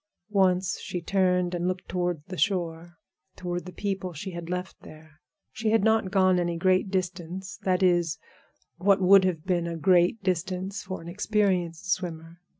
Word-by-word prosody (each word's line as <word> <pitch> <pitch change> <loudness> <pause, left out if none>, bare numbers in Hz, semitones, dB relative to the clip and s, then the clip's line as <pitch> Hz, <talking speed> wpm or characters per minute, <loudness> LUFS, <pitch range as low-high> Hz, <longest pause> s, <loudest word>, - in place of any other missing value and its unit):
Once 190 -2 +2
she 180 - -4
turned 180 0 +1
and 175 0 -1
looked 185 0 -3
toward 175 -4 -2
the 185 - -7
shore, 175 -3 -1 0.4
toward 175 -1 -4
the - - -7
people 190 -1 -3
she 190 +5 -6
had 170 -1 -7
left 180 +1 -4
there. 155 -1 -15 0.3
She 220 0 -2
had 225 -2 +3
not 220 -3 +3
gone 185 -2 +3
any 175 -1 -1
great 185 +2 +2
distance—that 185 0 -2
is, 175 -3 +2 0.6
what 195 +2 +3
would 190 +1 +6
have 170 -4 -1
been 175 -2 0
a 170 -1 -4
great 180 +4 +3
distance 185 +2 -2
for 185 -2 -6
an - - -10
experienced 190 -2 0
swimmer. 165 -3 -3
180 Hz, 160 wpm, -27 LUFS, 175-190 Hz, 0.6 s, would